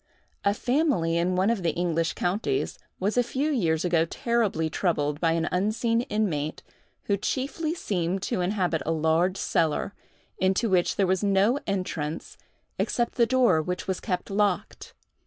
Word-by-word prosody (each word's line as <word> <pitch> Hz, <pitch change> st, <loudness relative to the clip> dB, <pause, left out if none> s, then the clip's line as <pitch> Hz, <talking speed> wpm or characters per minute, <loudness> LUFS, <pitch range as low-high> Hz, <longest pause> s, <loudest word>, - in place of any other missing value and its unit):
A 200 Hz, 0 st, +2 dB
family 245 Hz, -, +1 dB
in 175 Hz, +2 st, +1 dB
one 190 Hz, +4 st, +3 dB
of 230 Hz, -4 st, -1 dB
the 165 Hz, -3 st, 0 dB
English 165 Hz, -2 st, 0 dB
counties, 210 Hz, -, -1 dB, 0.2 s
was 205 Hz, +5 st, -1 dB
a -, -, +6 dB
few 270 Hz, +6 st, -1 dB
years 165 Hz, -, +1 dB
ago 170 Hz, -2 st, +3 dB
terribly 205 Hz, -3 st, 0 dB
troubled 150 Hz, -3 st, -1 dB
by 165 Hz, -1 st, +2 dB
an 165 Hz, -1 st, 0 dB
unseen 220 Hz, +5 st, +1 dB
inmate 160 Hz, -9 st, -1 dB, 0.4 s
who 200 Hz, -, 0 dB
chiefly 285 Hz, -, -2 dB
seemed 185 Hz, -, -2 dB
to 200 Hz, -3 st, -1 dB
inhabit 180 Hz, -3 st, 0 dB
a 165 Hz, -, -1 dB
large 165 Hz, +4 st, +2 dB
cellar, 165 Hz, +4 st, 0 dB, 0.5 s
into 190 Hz, +4 st, +1 dB
which 180 Hz, -2 st, +2 dB
there 195 Hz, -, +2 dB
was 185 Hz, +1 st, +1 dB
no 200 Hz, +6 st, +3 dB
entrance 170 Hz, -6 st, -3 dB, 0.4 s
except 240 Hz, -1 st, 0 dB
the 235 Hz, -2 st, +3 dB
door 245 Hz, -11 st, +4 dB
which 180 Hz, +4 st, -4 dB
was 190 Hz, -1 st, -1 dB
kept 180 Hz, -2 st, -3 dB
locked. 205 Hz, 0 st, -1 dB
185 Hz, 155 wpm, -26 LUFS, 165-220 Hz, 0.5 s, a